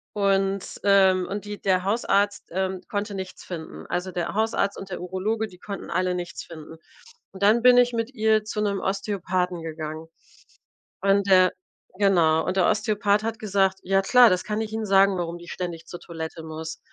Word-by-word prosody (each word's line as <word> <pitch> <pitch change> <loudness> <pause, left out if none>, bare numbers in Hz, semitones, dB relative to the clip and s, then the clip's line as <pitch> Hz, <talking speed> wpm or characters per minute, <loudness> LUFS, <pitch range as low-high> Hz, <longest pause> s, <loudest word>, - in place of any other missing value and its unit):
Und 195 -1 0
ähm, 190 -2 +4
und 205 +1 -4
die 205 0 -7
der 185 -1 +1
Hausarzt, 205 -1 0
ähm, 190 +1 -2
konnte 205 0 -3
nichts 190 -1 -7
finden. 165 -3 -8
Also, 180 +1 -3
der 175 0 -3
Hausarzt 215 -2 0
und 195 - -8
der 180 - -6
Urologe, 210 +5 -2
die 180 -2 -17
konnten 200 -1 -7
alle 180 0 0
nichts 175 -1 -6
finden. 160 -1 -11 0.5
Und 195 +1 -7
dann 220 +3 +5
bin 250 0 +6
ich 245 0 +4
mit 230 +3 -2
ihr 220 -1 +2
zu 215 0 -4
'nem 200 -2 0
Osteopathen 185 -3 -2
gegangen 160 0 -6 0.9
und, 200 0 +2
äh 185 -1 +7 0.5
genau, 170 -6 +3
und 185 - -2
der 185 - +4
Osteopath 210 -1 +1
hat 225 0 -3
gesagt: 195 -2 +1
„Ja 195 +1 +2
klar, 245 +2 +7
das 180 0 0
kann 215 +1 -2
ich 215 -1 -4
Ihnen 220 0 -3
sagen, 195 -1 +4
warum 170 0 -3
die 170 - -13
ständig 170 -2 -6
zur 175 - -8
Toilette 160 -1 -7
muss.“ 160 0 -7
195 Hz, 185 wpm, -24 LUFS, 180-210 Hz, 0.9 s, äh